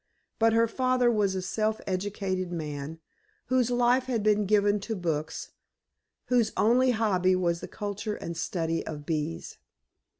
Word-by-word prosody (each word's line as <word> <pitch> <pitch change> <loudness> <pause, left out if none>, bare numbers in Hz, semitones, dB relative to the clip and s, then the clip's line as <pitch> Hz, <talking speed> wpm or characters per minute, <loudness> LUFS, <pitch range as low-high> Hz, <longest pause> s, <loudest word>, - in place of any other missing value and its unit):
But 225 0 +4
her 230 0 +4
father 255 0 +2
was 205 -4 +1
a 185 - -2
self 215 +3 -1
educated 185 -1 -2
man, 150 -2 -5 0.5
whose 255 -2 +2
life 245 +1 +3
had 235 -5 -1
been 210 -1 +3
given 205 0 +3
to 220 +3 -4
books, 160 -4 -3 0.7
whose 240 -3 +2
only 250 +4 +4
hobby 195 -6 +2
was 170 -2 0
the - - -6
culture 205 +1 -4
and 170 0 -6
study 165 -1 -2
of 150 -2 -6
bees. 150 - -3
205 Hz, 145 wpm, -28 LUFS, 175-225 Hz, 0.7 s, But